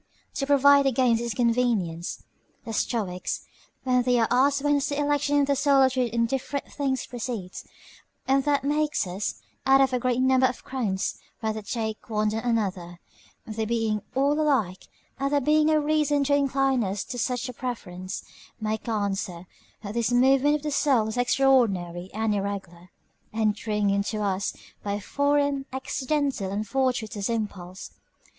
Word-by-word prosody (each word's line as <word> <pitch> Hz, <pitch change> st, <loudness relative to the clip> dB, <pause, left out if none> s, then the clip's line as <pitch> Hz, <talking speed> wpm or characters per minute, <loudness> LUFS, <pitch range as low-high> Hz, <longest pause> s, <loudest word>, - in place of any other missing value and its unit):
To 275 Hz, -, -1 dB
provide 280 Hz, 0 st, +6 dB
against 245 Hz, -3 st, +2 dB
this 235 Hz, -1 st, -2 dB
inconvenience, 230 Hz, -9 st, 0 dB, 0.4 s
the 225 Hz, -, -5 dB
Stoics, 195 Hz, -6 st, -2 dB, 0.4 s
when 250 Hz, -1 st, +3 dB
they 245 Hz, 0 st, +2 dB
are 225 Hz, -1 st, +3 dB
asked 275 Hz, +3 st, +3 dB
whence 290 Hz, -1 st, +2 dB
the 285 Hz, -, -2 dB
election 290 Hz, 0 st, +1 dB
in 285 Hz, -, +4 dB
the 280 Hz, 0 st, +1 dB
soul 280 Hz, 0 st, +4 dB
of 260 Hz, -1 st, +3 dB
two 255 Hz, -2 st, +1 dB
indifferent 250 Hz, +4 st, -2 dB
things 270 Hz, -3 st, -1 dB
proceeds, 235 Hz, -6 st, -6 dB, 0.6 s
and 270 Hz, +1 st, +3 dB
that 285 Hz, -2 st, +2 dB
makes 295 Hz, -3 st, +1 dB
us, 185 Hz, +3 st, -3 dB, 0.3 s
out 270 Hz, 0 st, +5 dB
of 265 Hz, -1 st, +3 dB
a 250 Hz, -, +1 dB
great 250 Hz, 0 st, 0 dB
number 260 Hz, 0 st, +4 dB
of 250 Hz, -, -6 dB
crowns, 210 Hz, -8 st, -2 dB, 0.2 s
rather 220 Hz, 0 st, -1 dB
take 220 Hz, 0 st, -4 dB
one 215 Hz, -1 st, +1 dB
than 220 Hz, +1 st, -2 dB
another, 195 Hz, -7 st, -2 dB, 0.5 s
they 220 Hz, 0 st, -3 dB
being 220 Hz, -1 st, 0 dB
all 280 Hz, +2 st, +3 dB
alike, 225 Hz, -12 st, 0 dB, 0.3 s
and 275 Hz, +1 st, 0 dB
there 290 Hz, -, +3 dB
being 300 Hz, +3 st, +3 dB
no 310 Hz, 0 st, +4 dB
reason 295 Hz, -1 st, +2 dB
to 285 Hz, +1 st, +1 dB
incline 270 Hz, -3 st, +2 dB
us 195 Hz, +1 st, -2 dB
to 245 Hz, -, -6 dB
such 250 Hz, +1 st, -1 dB
a 250 Hz, -, -6 dB
preference, 185 Hz, -8 st, -5 dB, 0.4 s
make 220 Hz, +1 st, -3 dB
answer, 195 Hz, -5 st, -2 dB, 0.4 s
that 205 Hz, 0 st, -5 dB
this 235 Hz, +1 st, 0 dB
movement 270 Hz, +4 st, +4 dB
of 300 Hz, -, -4 dB
the 300 Hz, -, -2 dB
soul 260 Hz, -7 st, +2 dB
is 220 Hz, -, -4 dB
extraordinary 225 Hz, -9 st, +2 dB
and 220 Hz, 0 st, 0 dB
irregular, 195 Hz, -3 st, -4 dB, 0.4 s
entering 210 Hz, -1 st, 0 dB
into 205 Hz, +2 st, -1 dB
us 195 Hz, -1 st, -1 dB, 0.3 s
by 200 Hz, -, -3 dB
a 205 Hz, -, -2 dB
foreign, 285 Hz, +3 st, 0 dB
accidental, 265 Hz, -4 st, -1 dB
and 210 Hz, +2 st, -3 dB
fortuitous 235 Hz, -5 st, -1 dB
impulse. 195 Hz, -5 st, -4 dB
245 Hz, 160 wpm, -26 LUFS, 210-275 Hz, 0.6 s, provide